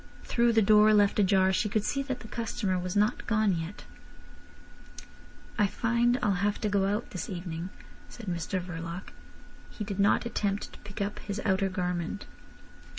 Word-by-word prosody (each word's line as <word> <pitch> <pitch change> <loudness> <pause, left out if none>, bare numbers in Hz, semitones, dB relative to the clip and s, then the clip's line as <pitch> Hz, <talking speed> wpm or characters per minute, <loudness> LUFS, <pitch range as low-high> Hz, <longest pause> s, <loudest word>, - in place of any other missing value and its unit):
Through 235 -1 +2
the 225 -1 +5
door 215 +1 +6
left 205 0 +4
ajar 190 -1 +4
she 210 - +1
could 210 0 0
see 275 +5 -1
that 265 -2 -4
the - - -9
customer 215 -5 -2
was 180 +1 -4
not 210 +4 +1
gone 215 -4 +2
yet. 165 +4 -6 1.7
"I 205 - +5
find 235 +3 +1
I'll 195 -4 +1
have 205 0 +1
to 215 - 0
go 200 -1 +2
out 210 +4 -2
this 180 -4 -5
evening," 175 -2 -5 0.4
said 235 - -10
Mr 175 +1 -2
Verloc. 170 0 -6 0.6
He 215 - -6
did 200 -1 -5
not 200 +4 +3
attempt 205 -3 -2
to - - -13
pick 205 +1 -8
up 205 +1 -4
his 205 0 -5
outer 195 -1 +2
garment. 180 +1 -3
200 Hz, 170 wpm, -29 LUFS, 185-215 Hz, 1.7 s, door